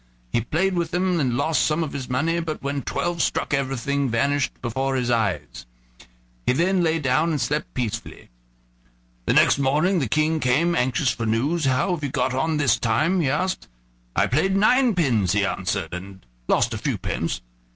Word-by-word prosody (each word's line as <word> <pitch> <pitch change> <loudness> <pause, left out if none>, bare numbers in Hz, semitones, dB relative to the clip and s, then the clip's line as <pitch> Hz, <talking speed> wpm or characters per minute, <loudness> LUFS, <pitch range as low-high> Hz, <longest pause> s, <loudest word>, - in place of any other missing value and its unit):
He 120 - +1
played 175 - 0
with 170 -2 -1
them 180 0 0
and 125 -5 0
lost 160 +3 +1
some 155 +2 +1
of 150 - -5
his 130 -3 -5
money, 160 +7 0
but 160 -3 -4
when 140 0 -2
twelve 175 +6 -2
struck - - -1
everything 140 0 -1
vanished 135 +3 +1
before 130 +3 -2
his 125 -2 0
eyes. 110 - -2 0.8
He 125 - +3
lay 170 0 +2
down 145 +2 +1
and 155 -3 -1
slept 145 +5 -2
peacefully. 120 - -5 1.0
The - - +3
next - - +4
morning 155 +8 +2
the 130 -7 -2
King 155 +3 +1
came, 150 +7 +2
anxious 125 -1 +1
for 115 - -3
news. 140 +9 0
"How 135 +7 +1
have 160 -4 -4
you 140 - -1
got 130 - 0
on 150 +4 0
this 145 -4 +2
time?" 155 +11 +1
he 140 - +1
asked. 185 +7 -1 0.5
"I - - +3
played 190 +9 +1
ninepins," 180 - +3
he 100 -1 +2
answered, - - -2
"and 95 -1 -8 0.2
lost - - +2
a - - -4
few - - -1
pence." - - -3
140 Hz, 180 wpm, -23 LUFS, 125-165 Hz, 1.0 s, next